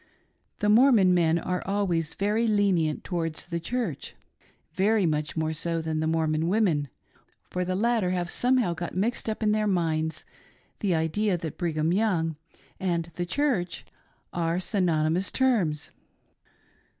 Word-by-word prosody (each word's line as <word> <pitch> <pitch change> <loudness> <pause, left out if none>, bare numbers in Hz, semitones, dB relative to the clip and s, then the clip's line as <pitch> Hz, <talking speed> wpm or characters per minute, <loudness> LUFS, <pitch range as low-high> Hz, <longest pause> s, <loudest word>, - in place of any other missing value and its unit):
The 210 - +2
Mormon 215 -4 +6
men 170 -2 +3
are 180 +2 -2
always 185 -5 -1
very 210 +4 +1
lenient 190 -8 +1
towards 165 -4 -3
"the 170 -1 -3
Church 205 - -4 0.2
" - - -33
— - - -44
very 215 -1 +3
much 150 -1 -1
more 160 0 0
so 165 +1 -2
than 160 -1 -2
the 160 - 0
Mormon 160 0 +1
women, 175 -8 +1 0.6
for 180 - -1
the 185 +1 -2
latter 225 -2 +1
have 180 -1 -1
somehow 250 -7 +2
got 175 +1 -5
mixed 225 +3 -1
up 220 +1 -3
in 210 - +3
their 215 0 +1
minds 160 -4 -1 0.5
the 190 -4 +1
idea 175 +5 0
that 160 -3 -7
Brigham 160 -1 0
Young 180 -6 +1 0.4
and 170 -3 -1
"the 175 +2 -3
Church" 210 -7 -1 0.5
are 170 0 0
synonymous 180 -2 0
terms. 200 - +1
175 Hz, 150 wpm, -27 LUFS, 160-210 Hz, 0.6 s, Mormon